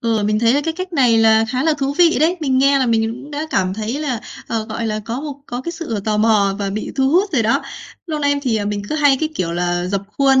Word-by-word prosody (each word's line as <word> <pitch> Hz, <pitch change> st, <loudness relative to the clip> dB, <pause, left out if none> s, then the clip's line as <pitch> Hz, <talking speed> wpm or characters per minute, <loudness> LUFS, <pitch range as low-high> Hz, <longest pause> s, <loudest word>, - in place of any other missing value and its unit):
Ừ, 225 Hz, -2 st, 0 dB
mình 210 Hz, +1 st, +1 dB
thấy 230 Hz, +3 st, +3 dB
là 290 Hz, -, +2 dB
cái 325 Hz, -, -1 dB
cách 370 Hz, 0 st, -6 dB
này 245 Hz, -7 st, +3 dB
là 220 Hz, 0 st, +5 dB
khá 255 Hz, +1 st, -1 dB
là 320 Hz, -1 st, +2 dB
thú 275 Hz, +1 st, -1 dB
vị 340 Hz, -2 st, +5 dB
đấy. 340 Hz, +4 st, +3 dB
Mình 265 Hz, -3 st, +1 dB
nghe 275 Hz, +1 st, +4 dB
là 260 Hz, -, +1 dB
mình 225 Hz, -1 st, +1 dB
cũng 275 Hz, +5 st, -10 dB
đã 300 Hz, +2 st, -4 dB
cảm 185 Hz, 0 st, 0 dB
thấy 220 Hz, +6 st, -3 dB
là, 255 Hz, -7 st, -2 dB, 0.3 s
ờ, 225 Hz, -1 st, -2 dB
gọi 225 Hz, +1 st, -4 dB
là, 215 Hz, 0 st, -2 dB
có 235 Hz, +4 st, -4 dB
một 295 Hz, -2 st, -5 dB
có 245 Hz, +1 st, -4 dB
cái 340 Hz, +6 st, -5 dB
sự 275 Hz, -, -4 dB
tò 215 Hz, -1 st, 0 dB
mò 210 Hz, -3 st, +3 dB
và 200 Hz, -1 st, -2 dB
bị 215 Hz, +2 st, -4 dB
thu 265 Hz, 0 st, +2 dB
hút 385 Hz, +4 st, +2 dB
rồi 240 Hz, -6 st, +2 dB
đó. 225 Hz, -, +1 dB, 0.4 s
Lâu 310 Hz, -2 st, -3 dB
nay 285 Hz, -1 st, +2 dB
thì, 235 Hz, -5 st, 0 dB
à, 205 Hz, -, -2 dB
mình 205 Hz, 0 st, -2 dB
cứ -, -, -2 dB
hay 285 Hz, -3 st, +4 dB
cái 310 Hz, -, 0 dB
kiểu 170 Hz, -, -2 dB
là 175 Hz, 0 st, -1 dB
rập 195 Hz, +1 st, -2 dB, 0.2 s
khuôn 270 Hz, -1 st, +5 dB
240 Hz, 290 wpm, -19 LUFS, 215-285 Hz, 0.4 s, là